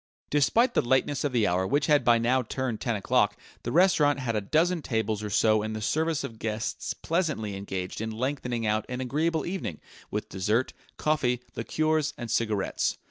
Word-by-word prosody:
Despite 185 - +3
the - - +3
lateness 130 +3 +1
of 145 - 0
the 120 -4 +2
hour, 90 +1 +1
which 145 +5 +2
had 150 -1 +4
by 120 -1 +5
now 120 +3 +2
turned 125 -1 -3
ten 120 -3 0
o'clock, 105 0 +2 0.2
the 120 - -4
restaurant 155 -4 +4
had 125 -4 -2
a 105 - +1
dozen 165 - +1
tables 110 -5 -1
or 105 - -4
so 110 +1 +3
in 110 +1 -3
the 110 - -3
service 155 +8 0
of 110 -1 -7
guests 110 +1 -3
pleasantly 155 - -1
engaged 95 0 -4
in 110 - -2
lengthening 125 0 -2
out 105 0 +1
an 125 0 -3
agreeable 155 +5 0
evening 175 - -4 0.3
with - - -3
dessert, 105 +7 0 0.2
coffee, 140 -6 +1 0.2
liqueurs 155 -2 0
and 120 -2 -5
cigarettes. 110 -4 0
120 Hz, 185 wpm, -27 LUFS, 110-150 Hz, 0.3 s, by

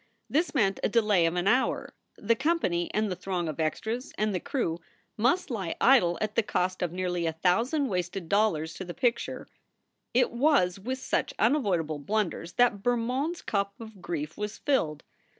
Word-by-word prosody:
This 315 +2 0
meant 195 -7 +2
a - - +1
delay 210 -6 +3
of 165 - -2
an 175 +2 0
hour. 250 +5 +1 0.2
The 230 - +2
company 265 - 0
and 215 -1 0
the - - -1
throng 180 -2 -3
of 155 -1 -5
extras 220 - -2
and 215 -1 0
the 180 - 0
crew 170 -11 -2 0.4
must 255 - +1
lie 190 -8 -3
idle 220 -10 +5
at 215 -1 -1
the - - +3
cost 185 -3 -1
of 175 -3 0
nearly 180 -1 -1
a 160 - -1
thousand 230 - +1
wasted 180 -3 -3
dollars 165 -6 +1
to 190 - -6
the 175 -1 -7
picture 245 -3 -1 0.7
It 250 0 +3
was 240 - +2
with 255 +6 -3
such - - -1
unavoidable 195 - +1
blunders 180 0 -2
that 240 -5 +3
Bermond 245 - 0
s - - -12
cup 200 -1 -2
of 220 -4 -11
grief 155 -3 -4
was 210 0 -4
filled. 160 - 0
200 Hz, 180 wpm, -28 LUFS, 175-245 Hz, 0.7 s, idle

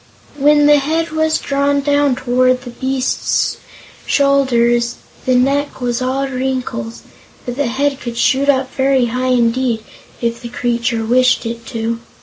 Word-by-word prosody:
When 295 +1 +4
the 295 0 +6
head 320 +4 -1
was 315 0 +1
drawn 280 0 0
down 285 -1 +2
toward 255 0 +1
the 245 - -8
beast's 260 +1 -1 0.5
shoulders, 240 -4 +2 0.3
the 255 - +3
neck 275 +3 +1
was 245 -1 -2
all 265 +2 -1
wrinkles, 255 - -4 0.4
but 245 - -4
the 285 -1 -1
head 275 +3 -1
could 235 -1 -6
shoot 270 +3 +2
up 265 -2 +1
very 265 -1 +2
high 255 +1 -1
indeed, 240 -2 +1 0.4
if 235 0 -2
the 240 - -7
creature 235 -1 -1
wished 255 +2 +3
it 230 0 -6
to. 230 -1 -3
255 Hz, 145 wpm, -16 LUFS, 240-275 Hz, 0.5 s, the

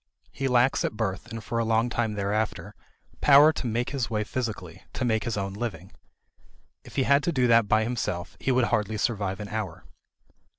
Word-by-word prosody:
He 135 - -2
lacks 125 +1 +3
at 105 - -3
birth 95 -4 -3
and 115 -1 -7
for 115 +3 -2
a - - +2
long 115 +1 +2
time 120 -2 -1
thereafter 100 -2 -2 0.5
power 145 +2 +7
to 130 - -4
make 120 +2 -1
his 135 -5 -2
way 105 -2 -1
physically, 115 0 -5
to 130 - -2
make 110 -1 0
his 115 -3 -2
own 95 -1 -3
living. 115 +1 -5 0.9
If - - -14
he 135 - +2
had 140 +2 +4
to 170 - 0
do 130 -5 +2
that 115 -3 +4
by 110 +2 +3
himself, 110 -7 -3
he 135 - 0
would 125 -1 +3
hardly 105 0 0
survive 100 -2 -1
an 105 -1 -6
hour. 105 -6 -5
115 Hz, 200 wpm, -26 LUFS, 105-125 Hz, 0.9 s, power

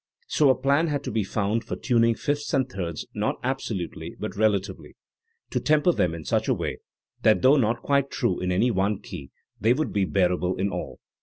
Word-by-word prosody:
So 150 - +3
a 130 - +5
plan 140 +5 +2
had 145 -2 -2
to - - -4
be 110 - 0
found 105 +3 -1
for - - -4
tuning 115 -2 +2
fifths 145 +4 -2
and 130 -1 +2
thirds 90 - -5
not - - -1
absolutely 120 -9 -4
but - - -5
relatively, 100 -2 -1 0.6
to - - 0
"tem 150 -1 +2
per" 180 - +5
them 90 - 0
in 80 -2 -8
such - - 0
a - - +2
way - - -4 0.4
that 110 +2 +4
though 130 +3 +7
not 120 -3 +1
quite 140 -1 +2
true 90 - -1
in 90 0 -1
any 115 +7 +2
one 100 0 0
key 70 - -8 0.3
they 115 +4 +4
would 155 +4 -2
be 100 -2 +2
bearable 90 -1 +1
in 100 +2 -1
all. 90 - -5
110 Hz, 210 wpm, -25 LUFS, 95-135 Hz, 0.6 s, though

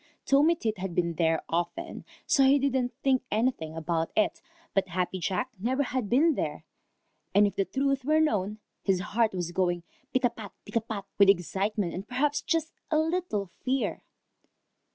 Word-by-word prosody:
Tommy 295 +5 +5
Tit 220 - -2
had 185 -2 -4
been 170 -1 +1
there 160 -1 +1
often, 175 - -3 0.2
so 275 - +4
he 270 +2 +6
didn't 260 -3 +1
think 265 -2 +3
anything 210 -9 0
about 165 0 -1
it, 215 - +1 0.3
but 195 -1 +2
Happy 185 +1 -2
Jack 195 +9 -1
never 260 +7 +1
had 250 -5 -2
been 310 +7 +4
there, - - -3 0.7
and 205 +1 +7
if 205 - -1
the 195 - +1
truth 275 +2 0
were 310 +4 +3
known, 210 -9 +1 0.2
his 190 -2 +1
heart 220 +4 +1
was 175 -2 -2
going 175 -1 0 0.3
pitapat, 240 -6 -1
pitapat, 220 -3 -3
with 200 -1 +7
excitement 195 +1 +1
and 190 +3 -6
perhaps 285 +4 0
just 330 -1 -1 0.2
a 310 - +2
little 320 - 0 0.2
fear. 260 +1 0
215 Hz, 160 wpm, -28 LUFS, 185-270 Hz, 0.7 s, and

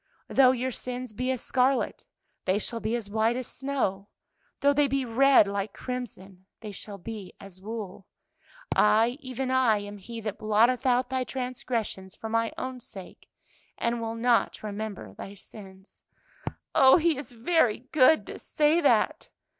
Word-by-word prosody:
"'Though 265 -2 +5
your 260 0 -2
sins 250 -1 -5
be 255 +4 -2
as 260 -2 -1
scarlet, 260 +1 +1 0.4
they 185 +1 +2
shall 230 +2 -2
be 225 +1 -1
as 230 -4 -4
white 220 +3 +1
as 255 0 -3
snow; 250 -9 -2 0.5
though 285 0 +4
they 290 0 +3
be 270 0 -1
red 255 -1 +5
like 200 0 -3
crimson, 195 -7 -7
they 215 -2 -7
shall 200 +1 -6
be 205 0 -8
as 190 -1 -12
wool.' 205 -3 -7 0.7
"'I, 225 +4 +4
even 260 -1 -4
I, 255 -5 +4
am 205 0 -7
He 230 +4 -8
that 210 -1 -5
blotteth 230 +4 +3
out 250 +1 +2
thy 260 -1 0
transgressions 245 -7 -4
for 225 - -7
my 230 0 +1
own 255 -1 -5
sake, 190 -5 -11 0.5
and 235 0 -1
will 225 0 -3
not 235 -1 +1
remember 205 - -6
thy 195 - -9
sins.'" 190 -1 -14 0.7
"Oh, 265 -1 +7
He 335 -1 +2
is 280 0 -6
very 240 -1 +2
good 310 +2 +5
to - - -8
say 310 +3 +2
that!" 290 - +2
230 Hz, 160 wpm, -27 LUFS, 205-255 Hz, 0.7 s, Oh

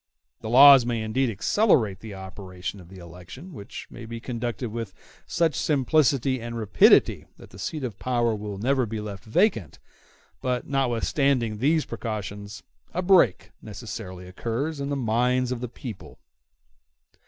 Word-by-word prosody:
The 110 - -6
laws 135 +1 +9
may 120 -2 -2
indeed 120 +4 0
accelerate 115 - +2
the 110 -3 -9
operation 95 0 -7
of 90 -2 -14
the 95 - -12
election, 90 - -11
which 100 -6 -9
may 120 -2 -9
be 115 0 -6
conducted 120 0 -4
with 115 -4 -6 0.3
such 165 -2 +1
simplicity 135 -3 +1
and 120 0 -5
rapidity 100 -7 +4
that - - -15
the 95 - -13
seat 150 +9 -4
of 115 -6 -5
power 120 -2 +1
will 105 -1 -5
never 130 +3 +1
be 110 +1 -4
left 105 -2 -7
vacant; 115 - +1 0.6
but, 125 -1 -1
notwithstanding 130 -3 0
these 155 +5 +2
precautions, 105 -2 -6 0.3
a 180 - -1
break 180 - +3
necessarily 100 -3 -8
occurs 120 - -3
in 140 0 -3
the 145 - -1
minds 125 +1 +1
of 125 -2 -3
the 125 - -4
people. 115 -4 -9
115 Hz, 150 wpm, -25 LUFS, 105-135 Hz, 0.6 s, laws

